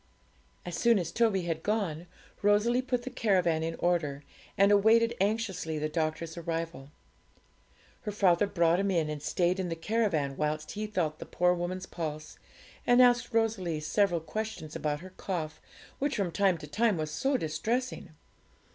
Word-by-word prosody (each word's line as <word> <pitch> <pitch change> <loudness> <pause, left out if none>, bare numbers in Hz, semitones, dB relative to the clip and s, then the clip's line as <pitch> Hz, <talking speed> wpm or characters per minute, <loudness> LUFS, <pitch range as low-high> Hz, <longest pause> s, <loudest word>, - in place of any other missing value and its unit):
As 175 - -4
soon 235 -2 +4
as 170 -3 -2
Toby 215 -3 +2
had 165 -2 -2
gone, 180 -6 -1 0.3
Rosalie 210 +4 +3
put 250 -2 -2
the 260 - -6
caravan 185 -9 +2
in 165 +1 -2
order, 155 -5 0 0.3
and 200 +1 +5
awaited 225 +3 +5
anxiously 195 -6 -1
the 155 0 -1
doctor's 160 +1 -2
arrival. 165 -4 -4 1.1
Her 210 - -4
father 195 -2 +3
brought 170 -2 +2
him 200 0 +1
in, 165 -5 +1
and 150 -1 -5
stayed 180 +4 +1
in 185 -2 -2
the 165 - -2
caravan 165 -7 0
whilst 155 0 -2
he 215 +1 -4
felt 170 -7 -2
the - - -8
poor 180 0 +2
woman's 180 +1 -3
pulse, 155 -3 -6 0.5
and 245 0 +5
asked 245 0 +5
Rosalie 215 -8 0
several 175 +2 +1
questions 215 -3 -5
about 150 -1 -2
her 185 0 -11
cough, 155 -5 -4 0.4
which 285 0 0
from 195 -5 -1
time 190 -1 +2
to 150 - -9
time 210 +6 +1
was 155 -1 -3
so 270 - +1
distressing. 225 +10 -2
180 Hz, 165 wpm, -30 LUFS, 160-215 Hz, 1.1 s, and